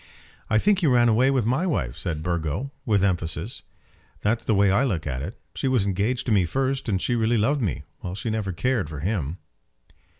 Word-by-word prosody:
"I 110 - +4
think 200 - +3
he 170 - +2
ran 120 -3 +5
away 120 +4 +4
with 130 -5 +1
my 130 +11 +1
wife," 60 - -1
said 80 -1 -3
Burgo, 85 - -2 0.2
with 105 -3 +3
emphasis; 90 +2 -1 0.6
"that's 110 +3 +1
the 110 - +1
way 100 -1 +4
I 100 +7 +3
look 95 - -1
at 65 -3 -3
it. 90 +10 -6
She 135 - -2
was 125 -6 +2
engaged 100 +6 0
to 120 - -1
me 100 -4 +4
first; 135 +8 -1
and 95 -3 +1
she 120 - 0
really 115 +1 +2
loved 135 +7 +2
me, 95 - -2 0.2
while 90 +1 -5
she 110 +3 -3
never 110 -3 -1
cared 115 - 0
for 75 -3 -6
him." 85 -4 -2
105 Hz, 210 wpm, -25 LUFS, 90-125 Hz, 0.6 s, ran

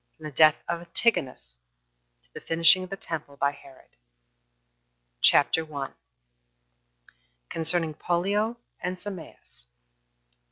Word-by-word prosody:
From 155 - -18
The 155 - -6
Death 155 +2 +6
Of 170 0 -2
Antigonus 135 - -1 0.7
To - - -33
The - - -8
Finishing 165 +3 +5
Of 185 - -9
The 195 - -6
Temple 150 -6 -6
By 140 0 +1
Herod. 135 -2 -17 1.3
CHAPTER 160 - +4
1. 145 -3 -6 1.6
Concerning 165 -1 0
Pollio 200 +8 -1 0.3
And 180 +1 -3
Sameas. 170 - -11
165 Hz, 110 wpm, -26 LUFS, 145-180 Hz, 1.6 s, Death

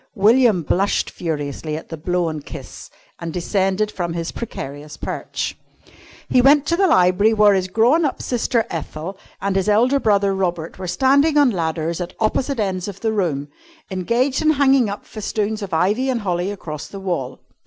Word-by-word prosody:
William 220 -2 +4
blushed 195 +6 0
furiously 155 -2 -4
at 160 - -10
the 165 - -5
blown 165 -1 -1
kiss - - -10 0.3
and 170 -1 -5
descended 195 +4 0
from 175 -4 -3
his 165 0 -3
precarious 145 - -7
perch. - - -4 0.7
He 250 - +4
went 285 +2 +5
to 335 - +1
the 385 +2 +3
library 185 - +4
where 210 -1 +6
his 190 -1 0
grown 235 - +3
up 285 - -1
sister 240 -1 0
Ethel 165 +3 -5 0.3
and 200 -1 0
his 195 +1 +1
elder 245 +7 +3
brother 200 -4 +2
Robert 175 -3 -2
were 185 - -5
standing 280 - +3
on 285 -4 +5
ladders 165 -2 -2
at 175 +1 -6
opposite 245 +4 0
ends 190 -3 -1
of 200 -1 -8
the 225 - +1
room, 150 -9 -1 0.4
engaged 235 +9 0
in 310 - +3
hanging 270 -5 +3
up 200 - -6
festoons 215 0 -3
of 200 -2 -5
ivy 205 +11 +1
and 245 -3 0
holly 180 -1 -1
across 155 -7 -6
the 195 - -9
wall. 165 -9 -3
195 Hz, 175 wpm, -20 LUFS, 170-235 Hz, 0.7 s, where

